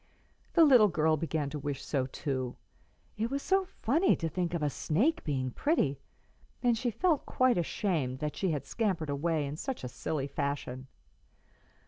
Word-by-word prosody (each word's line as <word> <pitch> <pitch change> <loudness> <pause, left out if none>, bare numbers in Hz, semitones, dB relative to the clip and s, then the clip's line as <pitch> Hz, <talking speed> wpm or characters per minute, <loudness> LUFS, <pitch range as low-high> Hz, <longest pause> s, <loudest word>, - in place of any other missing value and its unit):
The 335 -2 +7
little 250 -7 +7
girl 160 -3 +2
began 155 -2 -2
to 150 - -4
wish 140 -1 -4
so 130 -3 0
too, 130 -2 -3 0.6
it 225 +2 -1
was 275 +1 -2
so 385 0 +3
funny 340 - +2
to 165 - -2
think 175 +1 -2
of 160 - -2
a 150 - +2
snake 245 - +1
being 130 -4 -1
pretty, 145 - +1 0.6
and 240 -1 +4
she 240 +2 -1
felt 305 - +1
quite 255 -6 +3
ashamed 160 - -1
that 150 +1 -3
she 190 - 0
had 150 -4 -2
scampered 185 -10 -1
away 155 +1 0
in 140 +2 -5
such 260 - -4
a - - -3
silly 135 +3 -3
fashion. 140 -2 -3
160 Hz, 170 wpm, -31 LUFS, 140-235 Hz, 0.6 s, The